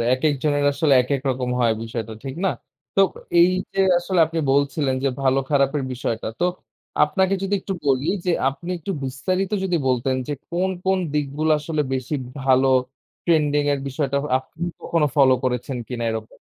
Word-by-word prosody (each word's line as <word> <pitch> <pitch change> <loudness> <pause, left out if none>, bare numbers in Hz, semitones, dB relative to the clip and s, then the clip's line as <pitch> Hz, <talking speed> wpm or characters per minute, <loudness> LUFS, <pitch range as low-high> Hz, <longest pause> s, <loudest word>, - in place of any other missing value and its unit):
একেক 145 +3 +1
জনের 145 -1 +2
আসলে 140 +1 +1
একেক 135 +2 -1
রকম 125 -1 -2
হয় 115 -2 +3
বিষয়টা, 115 -1 -5
ঠিক 135 -1 -5
না? 190 - +3 0.5
তো - - +5 0.4
এই 175 +1 +6 0.2
যে 195 - 0 0.2
আসলে 175 0 0
আপনি 165 +1 -4
বলছিলেন 140 0 +1
যে - - +4
ভালো 135 0 +3
খারাপের 140 0 +2
বিষয়টা। 120 -2 -3
তো - - +3 0.6
আপনাকে 190 +5 +1
যদি 195 +1 0
একটু 195 - -4
বলি 135 +1 +2 0.2
যে - - +3 0.2
আপনি 140 +6 -7
একটু 180 +4 -4
বিস্তারিত 185 +9 -1
যদি 180 -2 +1
বলতেন 130 +1 +1
যে - - -1 0.2
কোন 180 +2 0 0.2
কোন 190 0 +2 0.2
দিকগুলো 150 +2 0
আসলে 155 0 -1
বেশি 130 +3 -3 0.3
ভালো? 130 0 +4 0.6
ট্রেন্ডিং 150 -3 +3
এর 140 - -1
বিষয়টা 140 0 -1 0.2
আপনি 160 +5 -7 0.2
কখনো 165 -3 +1
ফলো 135 -2 +6
করেছেন 125 +1 -1
কিনা 120 -2 -3
এরকম? 110 -1 -6
140 Hz, 165 wpm, -22 LUFS, 130-165 Hz, 0.6 s, এই